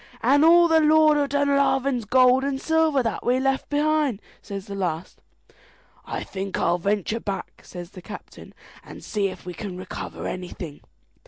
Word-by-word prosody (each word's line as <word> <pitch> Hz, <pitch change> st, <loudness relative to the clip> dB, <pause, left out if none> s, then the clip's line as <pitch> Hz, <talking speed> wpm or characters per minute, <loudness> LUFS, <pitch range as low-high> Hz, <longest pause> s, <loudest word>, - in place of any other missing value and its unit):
"And 280 Hz, +5 st, +4 dB
all 340 Hz, +1 st, +7 dB
the 325 Hz, -1 st, +4 dB
Lord 310 Hz, 0 st, +5 dB
of 285 Hz, -1 st, 0 dB
Dunlavin's 275 Hz, -3 st, +1 dB
gold 255 Hz, +3 st, +4 dB
and 275 Hz, -1 st, -1 dB
silver 320 Hz, -3 st, +2 dB
that 225 Hz, -, -3 dB
we 250 Hz, +1 st, +2 dB
left 270 Hz, 0 st, -1 dB
behind!" 295 Hz, -5 st, +1 dB, 0.2 s
says 200 Hz, -2 st, -7 dB
the 200 Hz, -, -8 dB
last. 180 Hz, -3 st, -4 dB, 0.8 s
"I -, -, -4 dB
think 195 Hz, 0 st, -5 dB
I'll 175 Hz, -, +1 dB
venture 205 Hz, +4 st, -1 dB
back," 200 Hz, -3 st, -6 dB
says 175 Hz, 0 st, -9 dB
the 185 Hz, -, -11 dB
captain, -, -, -11 dB, 0.3 s
"and -, -, -12 dB
see 205 Hz, -2 st, -1 dB
if 185 Hz, -, -9 dB
we 180 Hz, -, -6 dB
can 180 Hz, +1 st, -6 dB
recover 185 Hz, +1 st, -7 dB
anything." 175 Hz, -4 st, -6 dB
250 Hz, 165 wpm, -24 LUFS, 195-285 Hz, 0.8 s, all